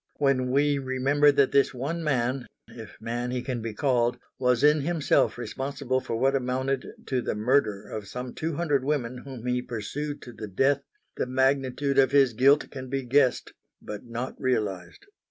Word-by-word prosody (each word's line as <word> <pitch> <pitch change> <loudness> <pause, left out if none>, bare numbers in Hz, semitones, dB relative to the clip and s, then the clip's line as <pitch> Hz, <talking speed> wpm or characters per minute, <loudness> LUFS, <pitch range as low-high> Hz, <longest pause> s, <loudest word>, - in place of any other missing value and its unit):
When 135 -3 +2
we 145 +2 +2
remember 135 +3 +3
that 140 -1 +3
this 140 -1 +3
one 160 +7 -3
man 130 -3 0 0.2
if 110 -3 -11
man 120 +2 -3
he 125 0 -2
can 125 -3 -3
be 110 -1 -5
called 120 -3 +1 0.2
was 125 0 +2
in 150 0 +5
himself 155 -4 +1
responsible 130 +1 -2
for 115 - -4
what 135 +3 +2
amounted 130 +1 -1 0.2
to 130 -2 -1
the - - -2
murder 105 -3 +1
of 105 -1 -6
some 125 +4 -6
two 160 -1 -3
hundred 145 -5 +1
women 130 -4 -1
whom 130 -3 -9
he 125 0 0
pursued 145 +7 -5
to 120 - -10
the 110 -1 -7
death, 135 +8 +2 0.4
the - - -1
magnitude 135 +1 +1
of 135 +1 +4
his 135 -4 +5
guilt 135 +6 +4
can 130 -2 -7
be 135 0 -2
guessed 130 +1 +2 0.3
but 105 -1 -7
not 120 +2 -5
realised. 110 - -2
130 Hz, 175 wpm, -27 LUFS, 120-140 Hz, 0.4 s, in